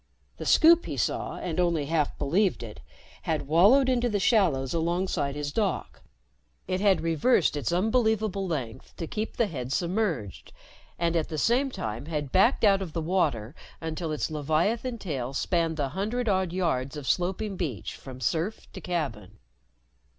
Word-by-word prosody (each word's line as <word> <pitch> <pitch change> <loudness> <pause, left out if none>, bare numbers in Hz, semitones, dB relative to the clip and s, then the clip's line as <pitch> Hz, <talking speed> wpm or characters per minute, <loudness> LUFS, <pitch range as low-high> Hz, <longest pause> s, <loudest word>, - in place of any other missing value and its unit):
The - - -6
Scoop, 335 +1 +6
he - - -4
saw, - - -1
and 175 -1 -3
only 170 -4 +1
half 150 -1 0
believed 175 - +1
it, 110 -2 -9 0.4
had 155 -3 -2
wallowed 205 - +5
into 245 -1 +2
the 205 -2 0
shallows 175 - +2
alongside 170 -3 -1
his 145 -1 -3
dock. 205 +3 -2 0.7
It 185 +1 -1
had 200 -2 +3
reversed 165 - +2
its 145 -6 -2
unbelievable 215 0 +1
length 130 -10 -5
to 165 - -3
keep 215 +6 -4
the 235 - +3
head 130 - -5
submerged, 170 - -2 0.4
and 170 0 0
at 160 -2 0
the 155 - -4
same 250 - +2
time 115 - -5
had 150 -4 -3
backed 230 +8 +3
out 200 -2 +5
of 175 -5 -5
the 170 - -2
water 150 - 0 0.3
until 160 0 -4
its 155 +1 -2
leviathan 170 - 0
tail 135 - -4
spanned 165 0 0
the 140 -3 -1
hundred 220 - -2
odd 190 -3 +1
yards 155 -7 -1
of 140 -3 -7
sloping 190 +3 0
beach 150 - -4
from 130 -2 -10
surf 170 +9 -1
to - - -8
cabin. 145 - -4
170 Hz, 165 wpm, -27 LUFS, 145-200 Hz, 0.7 s, Scoop